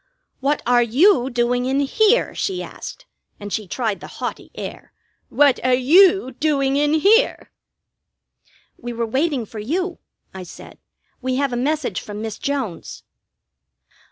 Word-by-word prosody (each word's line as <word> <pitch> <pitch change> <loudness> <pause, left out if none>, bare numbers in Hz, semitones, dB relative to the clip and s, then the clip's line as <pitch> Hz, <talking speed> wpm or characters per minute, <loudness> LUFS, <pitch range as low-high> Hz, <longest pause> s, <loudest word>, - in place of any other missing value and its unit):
"What 280 +3 0
are 245 0 +4
you 260 - +3
doing 245 0 0
in 270 +2 +1
here?" 440 - +2
she 380 -2 -3
asked, - - -9 0.3
and 205 -2 -7
she 215 0 -3
tried 220 0 -2
the - - -9
haughty - - -5
air - - -8 0.4
"What 285 -5 +3
are 255 0 +3
you 340 +4 +5
doing 275 -3 +1
in 295 +2 +2
here?" 430 +10 +3 1.3
"We 240 0 -6
were 230 0 -2
waiting 265 +1 -1
for 215 +1 -9
you," 345 - -3 0.3
I 190 - -8
said. 180 - -12 0.4
"We 255 0 -1
have 275 -1 0
a - - -1
message 270 - -1
from 210 0 -8
Miss 220 -1 -5
Jones." 265 -11 -4
265 Hz, 145 wpm, -21 LUFS, 240-310 Hz, 1.3 s, you